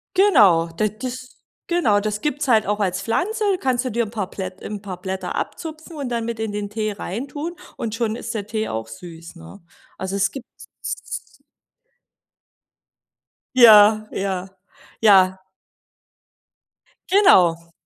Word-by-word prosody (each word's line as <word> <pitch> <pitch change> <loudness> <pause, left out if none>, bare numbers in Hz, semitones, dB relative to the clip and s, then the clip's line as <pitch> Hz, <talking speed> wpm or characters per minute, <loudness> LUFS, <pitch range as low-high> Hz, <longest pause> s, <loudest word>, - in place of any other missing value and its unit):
Genau. 215 - +5
Da 215 - +2
das 255 +4 -7 0.3
genau, 335 -13 +2
das 210 0 -3
gibt's 290 -1 -1
es - - -8
halt 225 -4 +4
auch 210 +1 -1
als 190 -2 -1
Pflanze, 370 - -1 0.2
kannst 255 -1 0
du 255 - -2
dir 235 +2 0
'n - - -9
paar 205 -5 -3
Plätt 190 -1 -7
'n 205 -1 -6
paar 190 -3 -7
Blätter 190 0 -4
abzupfen 320 0 -6
und 275 -4 -4
dann 235 -1 -2
mit 230 -1 -4
in 220 -1 -2
den 205 0 -4
Tee 215 0 -2
reintun 280 - -5 0.2
und 220 -2 -4
schon 225 -2 -1
ist 230 0 -6
der 205 -3 -4
Tee 220 0 -2
auch 110 0 -4
süß, 165 +8 -11
ne? 170 +4 -13 0.4
Also 190 +1 -4
es 200 0 +1
gibt's 260 -2 -12
s - - -4
s - - -7 2.3
Ja, 215 -3 +7
ja, 190 -1 -3 0.5
ja. 190 -3 +5 1.7
Genau. 170 - +4
215 Hz, 150 wpm, -21 LUFS, 190-250 Hz, 2.3 s, Ja